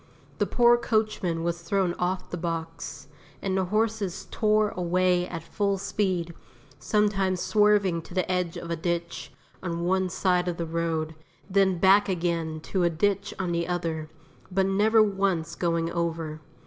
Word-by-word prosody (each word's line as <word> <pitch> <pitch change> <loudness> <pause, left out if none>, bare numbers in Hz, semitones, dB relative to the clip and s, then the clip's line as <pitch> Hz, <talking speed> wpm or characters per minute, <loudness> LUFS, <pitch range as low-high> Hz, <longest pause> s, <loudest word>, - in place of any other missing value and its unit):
The - - +2
poor 240 0 +5
coachman 215 -8 0
was 170 0 -2
thrown 185 0 0
off 180 +1 -2
the - - -2
box, 165 -4 -5 0.3
and 190 -1 -2
the 190 -1 +1
horses 215 -1 -1
tore 215 -1 +2
away 180 0 +1
at 165 -3 -6
full 200 +2 -1
speed, 185 -3 -1 0.5
sometimes 195 -4 +1
swerving 205 -5 +3
to 175 - -12
the 185 - +1
edge 180 -1 -1
of 170 -1 -6
a - - +1
ditch 170 +1 -3 0.3
on 170 -2 -3
one 190 +1 +1
side 180 0 +1
of 175 -1 -2
the 170 - -2
road, 160 -1 -2 0.3
then 190 -1 +3
back 195 +3 +5
again 165 -3 -1
to 185 +3 -2
a 175 - +4
ditch 200 +4 0
on 185 -2 -2
the 170 0 -1
other, 165 -3 -2 0.4
but 190 +1 +2
never 215 +3 +4
once 195 -5 0
going 170 -1 0
over. 165 -2 -3
180 Hz, 160 wpm, -26 LUFS, 170-195 Hz, 0.5 s, poor